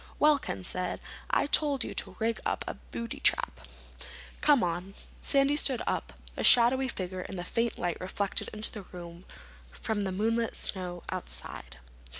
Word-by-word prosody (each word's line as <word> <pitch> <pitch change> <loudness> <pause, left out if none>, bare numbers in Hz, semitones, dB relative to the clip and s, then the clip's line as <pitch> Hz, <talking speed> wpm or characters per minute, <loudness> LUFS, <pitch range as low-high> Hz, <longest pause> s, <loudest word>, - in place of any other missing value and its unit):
"Well," 300 -1 +5
Ken 95 - -5
said, 180 - -2 0.3
"I - - +3
told 285 -2 +2
you - - -5
to - - 0
rig 225 0 0
up - - -1
a - - -2
booby 235 0 -7
trap." - - +1 0.8
"Come 290 -5 +5
on." 180 +3 -2 0.2
Sandy 275 +1 +4
stood 270 -4 +3
up, - - -2 0.2
a - - -3
shadowy 250 +2 +7
figure 185 -5 -4
in 195 - -7
the 175 - -4
faint 230 +4 0
light 175 -1 -2
reflected 195 +2 -1
into 215 0 +1
the 210 - -6
room 175 -1 -10 0.4
from 205 - -3
the 195 -1 -1
moonlit 225 +4 0
snow 180 -2 -2
outside. 60 +1 -3
205 Hz, 160 wpm, -30 LUFS, 180-240 Hz, 0.8 s, shadowy